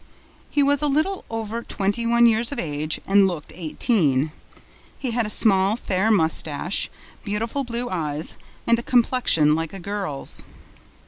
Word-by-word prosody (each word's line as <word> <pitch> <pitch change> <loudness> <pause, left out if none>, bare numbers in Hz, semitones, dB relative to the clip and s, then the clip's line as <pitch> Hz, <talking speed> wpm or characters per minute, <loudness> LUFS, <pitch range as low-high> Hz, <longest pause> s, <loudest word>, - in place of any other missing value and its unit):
He 290 - +2
was 285 0 +3
a 295 - +2
little 310 +7 0
over 225 0 -4
twenty 210 +1 -1
one 235 0 +5
years 230 +1 +3
of 285 - -4
age 155 0 -2
and 195 0 +5
looked 170 -5 -5
eighteen. 155 - +1 0.7
He 260 -3 -3
had 230 -1 0
a - - -5
small, 195 -2 +3
fair 195 -2 0
mustache, 160 -2 0 0.3
beautiful 225 +6 -2
blue 240 0 -3
eyes 155 -5 -1 0.3
and 235 0 +3
a - - -3
complexion 235 - +3
like 165 +2 -2
a 195 - -6
girl's. 195 -7 -3
210 Hz, 150 wpm, -23 LUFS, 165-235 Hz, 0.7 s, one